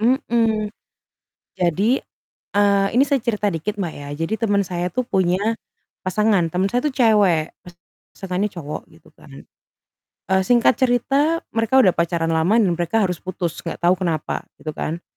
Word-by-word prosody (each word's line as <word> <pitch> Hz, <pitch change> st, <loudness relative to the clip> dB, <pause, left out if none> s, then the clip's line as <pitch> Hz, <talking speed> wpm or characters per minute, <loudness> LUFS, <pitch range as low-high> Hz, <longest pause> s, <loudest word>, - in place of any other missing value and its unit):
Mhm. 225 Hz, -3 st, +1 dB, 0.9 s
Jadi, 190 Hz, -, +2 dB, 0.6 s
eee, 200 Hz, -1 st, +3 dB
ini 265 Hz, -, +6 dB
saya 280 Hz, -1 st, +1 dB
cerita 210 Hz, -4 st, -1 dB
dikit, 185 Hz, +6 st, -3 dB
Mbak, 185 Hz, -6 st, -3 dB
ya. 145 Hz, 0 st, -8 dB
Jadi 165 Hz, +6 st, -3 dB
temen 205 Hz, -3 st, +1 dB
saya 175 Hz, -1 st, -3 dB
tuh 255 Hz, -, 0 dB
punya 185 Hz, -4 st, +1 dB, 0.6 s
pasangan. 185 Hz, -2 st, +1 dB
Temen 180 Hz, +3 st, 0 dB
saya 245 Hz, +5 st, 0 dB
tuh 300 Hz, -, 0 dB
cewek, 205 Hz, -, +3 dB, 0.6 s
pasangannya 195 Hz, +2 st, -2 dB
cowok, 155 Hz, -5 st, -6 dB
gitu, -, -, -20 dB
kan. -, -, -14 dB, 0.9 s
Eee, 190 Hz, -, +4 dB
singkat 245 Hz, +1 st, +4 dB
cerita 275 Hz, +6 st, +1 dB
mereka 225 Hz, +4 st, +3 dB
udah 185 Hz, -, +5 dB
pacaran 170 Hz, -1 st, -1 dB
lama 160 Hz, +6 st, +2 dB
dan 215 Hz, -6 st, +3 dB
mereka 175 Hz, +6 st, +1 dB
harus 180 Hz, -4 st, -1 dB
putus, 175 Hz, -3 st, -4 dB
enggak 165 Hz, -, -5 dB
tahu 175 Hz, +1 st, +3 dB
kenapa, 170 Hz, -4 st, -2 dB
gitu, 155 Hz, -, -6 dB
kan. 165 Hz, +3 st, -5 dB
195 Hz, 155 wpm, -21 LUFS, 175-225 Hz, 0.9 s, ini